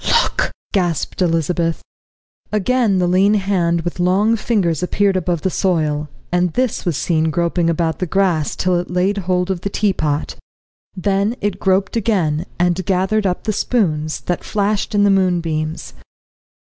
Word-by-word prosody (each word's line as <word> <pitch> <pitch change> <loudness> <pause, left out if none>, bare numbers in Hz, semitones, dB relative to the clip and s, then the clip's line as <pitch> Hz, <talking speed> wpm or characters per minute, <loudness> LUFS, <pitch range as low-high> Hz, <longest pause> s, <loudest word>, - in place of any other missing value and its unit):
"Look!" - - -1 0.2
gasped 175 -3 -1
Elizabeth. 165 -1 0 0.7
Again 215 0 +2
the 180 - +2
lean 190 +4 +3
hand 180 -4 +1
with 175 +1 -5
long 195 +6 +3
fingers 195 -8 0
appeared 195 +2 +1
above 175 -3 -1
the 190 - 0
soil, 155 -6 0 0.2
and 180 -1 +1
this 255 -5 -1
was 170 -5 0
seen 160 -2 +1
groping 170 +1 0
about 165 -1 -1
the 185 - -1
grass 175 -4 +1
till 180 -1 +1
it 175 - -5
laid 185 +3 0
hold 180 0 0
of 180 -2 -3
the 200 - -2
teapot. 155 -8 -1 0.6
Then 200 +4 0
it 200 -2 -2
groped 190 +1 +1
again, 185 -8 0
and 175 +1 +1
gathered 195 +3 +1
up 180 - -2
the 215 - -1
spoons, 155 -10 0
that 175 - -3
flashed 210 +1 -1
in 205 - +4
the 200 - +4
moonbeams. 170 -4 -1
180 Hz, 155 wpm, -18 LUFS, 170-200 Hz, 0.7 s, in